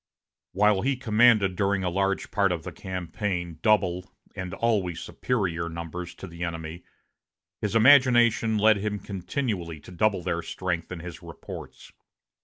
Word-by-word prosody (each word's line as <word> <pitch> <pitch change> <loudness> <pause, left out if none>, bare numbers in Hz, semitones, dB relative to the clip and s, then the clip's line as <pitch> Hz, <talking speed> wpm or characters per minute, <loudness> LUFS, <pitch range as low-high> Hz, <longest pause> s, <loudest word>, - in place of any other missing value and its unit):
While 105 0 +3
he 135 +1 +1
commanded 110 -5 +4
during 100 0 +1
a 90 - 0
large 95 +2 -1
part 100 -2 +2
of 85 -3 -3
the - - -6
campaign 90 -2 -4
double, 90 -4 +1 0.2
and 95 -2 -5
always 100 -8 0
superior, 90 -9 -2
numbers 85 +1 -6
to - - -9
the 85 -1 -7
enemy, 80 0 -5 0.8
his 105 +1 -2
imagination 120 -3 +5
led 110 0 +5
him 105 +1 -2
continually 95 - -4
to - - -13
double 95 0 +1
their 85 -1 -1
strength 85 0 -4
in 90 -3 -6
his 90 -1 -8
reports. - - -10
95 Hz, 145 wpm, -26 LUFS, 85-110 Hz, 0.8 s, imagination